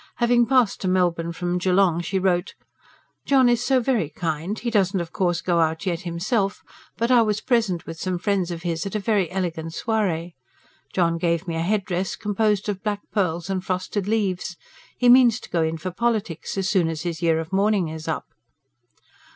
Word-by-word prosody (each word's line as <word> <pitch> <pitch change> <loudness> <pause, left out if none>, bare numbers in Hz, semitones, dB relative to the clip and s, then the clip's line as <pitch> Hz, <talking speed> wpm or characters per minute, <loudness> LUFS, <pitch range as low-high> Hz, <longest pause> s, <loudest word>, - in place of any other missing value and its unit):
Having 240 -1 +3
passed 250 -5 +2
to 190 - -1
Melbourne 175 -2 +1
from 175 +1 -2
Geelong 180 -2 +2
she 185 +3 -2
wrote: 185 0 0 0.7
JOHN 265 -2 +5
IS 240 0 +2
SO 265 -1 +3
VERY 235 - 0
KIND. 165 +5 -3
HE 235 - -3
DOESN'T 195 -3 +2
OF 170 -1 -5
COURSE 175 -3 0
GO 175 -2 +1
OUT 160 +3 0
YET 175 -3 -1
HIMSELF, 195 +4 -1 0.3
BUT 235 +2 0
I 245 -2 +6
WAS 215 -2 0
PRESENT 220 -9 0
WITH 165 0 -8
SOME 185 -1 -2
FRIENDS 190 -1 0
OF 170 -1 -6
HIS 170 +1 -2
AT 195 - -6
A - - +1
VERY 200 -4 +1
ELEGANT 170 -4 -3
SOIREE. 180 -7 -1 0.6
JOHN 170 -2 +1
GAVE 170 +1 0
ME 165 - -2
A 165 - -1
HEADDRESS 190 0 -1
COMPOSED 210 -1 0
OF 195 -2 -3
BLACK 205 -1 -2
PEARLS 175 -2 -1
AND 185 -1 -2
FROSTED 185 +2 -2
LEAVES. 190 -5 -1 0.4
HE 245 - +4
MEANS 245 -2 +6
TO - - -13
GO 170 - +1
IN 160 0 0
FOR 180 +4 -5
POLITIES 215 -4 -2
AS 190 -1 0
SOON 185 -4 +2
AS 160 -1 -4
HIS 170 -2 -4
YEAR 165 -1 +2
OF 160 +3 -6
MOURNING 195 -3 +2
IS 160 0 -7
UP. 160 - -2
185 Hz, 195 wpm, -23 LUFS, 170-210 Hz, 0.7 s, I